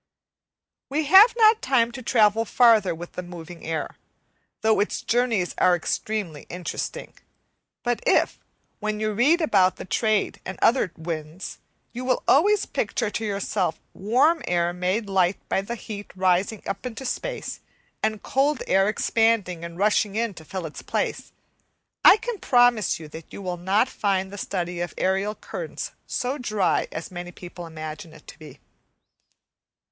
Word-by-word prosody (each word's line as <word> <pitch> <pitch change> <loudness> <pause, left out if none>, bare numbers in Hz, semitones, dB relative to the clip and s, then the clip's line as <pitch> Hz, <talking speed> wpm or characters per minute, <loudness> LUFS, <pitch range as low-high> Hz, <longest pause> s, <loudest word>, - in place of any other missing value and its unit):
We 300 +3 0
have 385 - +8
not 440 -1 +6
time 245 -3 +2
to 250 +2 -8
travel 225 -2 +3
farther 225 -5 +4
with 170 +1 -9
the - - -5
moving 175 -1 -10
air, 160 0 -4 0.6
though 220 0 +3
its 205 - -1
journeys 230 -7 +1
are 180 -1 +5
extremely 175 -2 -3
interesting; 180 0 -5 0.7
but 240 -1 -1
if, - - +3 0.4
when 215 0 -2
you 215 0 -1
read 290 - +3
about 190 - +3
the - - -8
trade 215 +3 0
and 190 - -6
other 230 -7 +3
winds, 160 +1 -6 0.3
you 245 +1 -5
will 255 -1 0
always 410 +7 +4
picture 215 - -2
to 225 - -3
yourselves 200 -4 -1 0.2
warm 255 - +2
air 175 0 +1
made 185 +5 -1
light 190 -1 +2
by - - +1
the 235 +5 -5
heat 210 -3 -8
rising 185 +3 +1
up 195 0 -4
into 250 +1 -6
space - - -4 0.4
and 215 -1 -1
cold 285 +3 +1
air 195 +2 +3
expanding 215 -6 +1
and 170 0 -7
rushing 205 0 +2
in 230 -1 0
to 165 - -12
fill 185 +2 -5
its 155 - -8
place, - - -3 0.7
I - - +9
can 460 -1 -5
promise 245 -7 +3
you 160 - -9
that 160 +1 -11
you - - -8
will 185 -2 -3
not 195 +7 +2
find 195 -5 -1
the - - -7
study 175 -2 -3
of 175 0 -4
aerial 195 +3 0
currents - - -6 0.2
so 260 +4 -2
dry 215 -6 0
as 160 - -6
many 175 0 -7
people 175 -1 -9
imagine 155 +1 -8
it 155 - -16
to - - -13
be. 155 - -12
205 Hz, 160 wpm, -24 LUFS, 180-235 Hz, 0.7 s, I